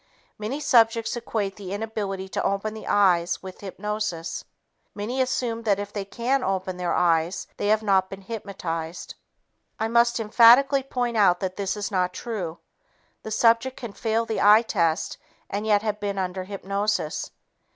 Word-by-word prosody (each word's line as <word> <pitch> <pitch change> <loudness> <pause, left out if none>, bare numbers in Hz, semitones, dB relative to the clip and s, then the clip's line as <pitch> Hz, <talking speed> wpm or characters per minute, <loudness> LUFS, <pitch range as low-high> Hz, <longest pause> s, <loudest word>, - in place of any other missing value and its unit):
Many 225 +7 -3
subjects 230 -5 +3
equate 215 -4 -3
the 195 -2 -6
inability 205 -3 -4
to - - -2
open 200 +2 -1
the 220 - -9
eyes 180 -4 +2
with 185 -1 -9
hypnosis. 200 -4 -4 0.5
Many 235 +6 -2
assume 245 -3 -1
that 210 -4 +2
if 205 0 -6
they 200 -2 -3
can 250 +6 -1
open 190 -1 -2
their 180 -1 -1
eyes, 170 0 +1
they - - -1
have 215 +1 +3
not 190 -2 +2
been 195 0 -8
hypnotized. 180 -6 -5 0.7
I 220 - 0
must 235 +1 +3
emphatically 245 +5 +6
point 245 -3 -2
out 180 -4 +4
that 185 -1 -2
this 195 0 -2
is 205 +1 -3
not 180 -2 0
true. 190 -9 -4 0.6
The - - -7
subject 230 +4 +3
can 235 -5 -7
fail 225 +1 0
the 225 - -2
eye 210 +3 +7
test 170 -8 0 0.3
and 205 +2 -2
yet 210 -1 +3
have 210 -1 -2
been 200 -1 -3
under 185 0 -3
hypnosis. 200 -3 -2
205 Hz, 160 wpm, -25 LUFS, 190-225 Hz, 0.7 s, eye